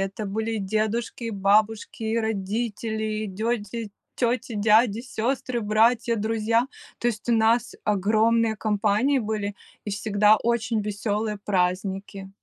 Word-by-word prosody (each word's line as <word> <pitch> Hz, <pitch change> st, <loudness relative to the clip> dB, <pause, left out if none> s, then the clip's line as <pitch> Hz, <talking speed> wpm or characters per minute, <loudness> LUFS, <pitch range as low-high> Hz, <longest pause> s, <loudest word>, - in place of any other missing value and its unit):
Это 195 Hz, +2 st, -3 dB
были 220 Hz, +3 st, -2 dB
дедушки 220 Hz, +4 st, -2 dB
и 230 Hz, -, -2 dB
бабушки, 210 Hz, +2 st, +1 dB
и 220 Hz, +1 st, 0 dB
родители, 220 Hz, 0 st, -2 dB
и -, -, -3 dB
тёти 220 Hz, +2 st, -3 dB, 0.3 s
тёти, 240 Hz, -1 st, 0 dB
и -, -, -4 dB
дяди, 215 Hz, +1 st, +4 dB
и -, -, -6 dB
сёстры, 250 Hz, +1 st, -2 dB
и -, -, -2 dB
братья, 225 Hz, +2 st, +2 dB
друзья, 225 Hz, +2 st, +1 dB, 0.3 s
то -, -, -2 dB
есть 235 Hz, 0 st, -2 dB
у -, -, +4 dB
нас 230 Hz, +1 st, +2 dB
огромные 220 Hz, +2 st, +2 dB
компании 215 Hz, +6 st, +1 dB
были 210 Hz, -2 st, -3 dB, 0.3 s
и 210 Hz, -, -4 dB
всегда 210 Hz, +1 st, +3 dB
очень 230 Hz, -1 st, 0 dB
весёлые 210 Hz, +1 st, -2 dB
праздники. 195 Hz, +1 st, -1 dB
220 Hz, 140 wpm, -25 LUFS, 205-230 Hz, 0.3 s, дяди